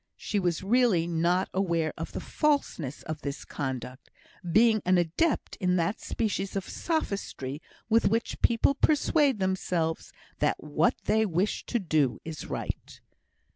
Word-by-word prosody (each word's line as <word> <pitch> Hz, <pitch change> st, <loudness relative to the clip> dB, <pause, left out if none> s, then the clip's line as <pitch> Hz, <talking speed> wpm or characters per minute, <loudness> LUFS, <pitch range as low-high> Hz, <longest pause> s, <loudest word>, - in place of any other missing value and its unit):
She 205 Hz, -, -1 dB
was 175 Hz, -2 st, 0 dB
really 215 Hz, -5 st, +3 dB
not 175 Hz, +2 st, +1 dB
aware 170 Hz, -4 st, 0 dB
of -, -, -6 dB
the -, -, -3 dB
falseness 280 Hz, -, -1 dB
of 155 Hz, -1 st, -5 dB
this 140 Hz, -2 st, -5 dB
conduct; 130 Hz, -2 st, -5 dB, 0.4 s
being 220 Hz, +2 st, +5 dB
an 185 Hz, 0 st, +3 dB
adept 175 Hz, -, 0 dB
in 180 Hz, -2 st, +1 dB
that 170 Hz, +4 st, 0 dB
species 200 Hz, -3 st, -2 dB
of 195 Hz, -1 st, -2 dB
sophistry 200 Hz, -, -3 dB, 0.3 s
with 225 Hz, +1 st, +4 dB
which 230 Hz, +3 st, -1 dB
people 235 Hz, +4 st, +4 dB
persuade 285 Hz, -2 st, +3 dB
themselves 185 Hz, -4 st, -1 dB, 0.3 s
that -, -, +2 dB
what 150 Hz, +2 st, +1 dB
they 220 Hz, 0 st, +3 dB
wish 190 Hz, 0 st, -1 dB
to 240 Hz, -, 0 dB
do 155 Hz, -, +1 dB
is 160 Hz, -1 st, -6 dB
right. -, -, -5 dB
185 Hz, 140 wpm, -28 LUFS, 160-220 Hz, 0.4 s, being